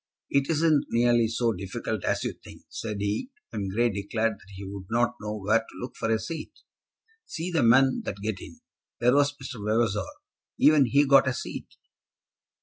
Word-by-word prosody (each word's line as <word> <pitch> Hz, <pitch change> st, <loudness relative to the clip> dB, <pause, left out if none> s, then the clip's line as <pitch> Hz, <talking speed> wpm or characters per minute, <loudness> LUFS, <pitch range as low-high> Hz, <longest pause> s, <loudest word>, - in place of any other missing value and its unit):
"It 140 Hz, +1 st, +2 dB
isn't 155 Hz, -2 st, +3 dB
nearly 120 Hz, -1 st, +3 dB
so 115 Hz, +1 st, 0 dB
difficult 100 Hz, +2 st, -4 dB
as -, -, 0 dB
you -, -, -2 dB
think," -, -, -15 dB
said 105 Hz, -2 st, -5 dB
he, 105 Hz, -, -2 dB, 0.2 s
when 100 Hz, -2 st, -3 dB
Grey 115 Hz, +4 st, +1 dB
declared 110 Hz, +3 st, -1 dB
that 100 Hz, -, -18 dB
he 100 Hz, -, -8 dB
would 95 Hz, -1 st, -8 dB
not 120 Hz, +1 st, +2 dB
know 105 Hz, 0 st, -4 dB
where 105 Hz, +3 st, +2 dB
to 115 Hz, -, -13 dB
look 125 Hz, -, -6 dB
for 115 Hz, -, -2 dB
a 110 Hz, -, +3 dB
seat. 160 Hz, -, -6 dB, 0.7 s
"See 170 Hz, +3 st, -4 dB
the 165 Hz, -, +2 dB
men 130 Hz, +3 st, +5 dB
that -, -, -3 dB
get 105 Hz, -2 st, -3 dB
in. -, -, -12 dB, 0.4 s
There 125 Hz, +1 st, +4 dB
was 145 Hz, 0 st, +4 dB
Mr. 130 Hz, -6 st, -7 dB
Vavasor. 105 Hz, -1 st, +1 dB, 0.5 s
Even 150 Hz, -4 st, +5 dB
he 140 Hz, +4 st, +4 dB
got 135 Hz, -1 st, +6 dB
a 130 Hz, -, 0 dB
seat." -, -, -7 dB
115 Hz, 185 wpm, -27 LUFS, 105-135 Hz, 0.7 s, got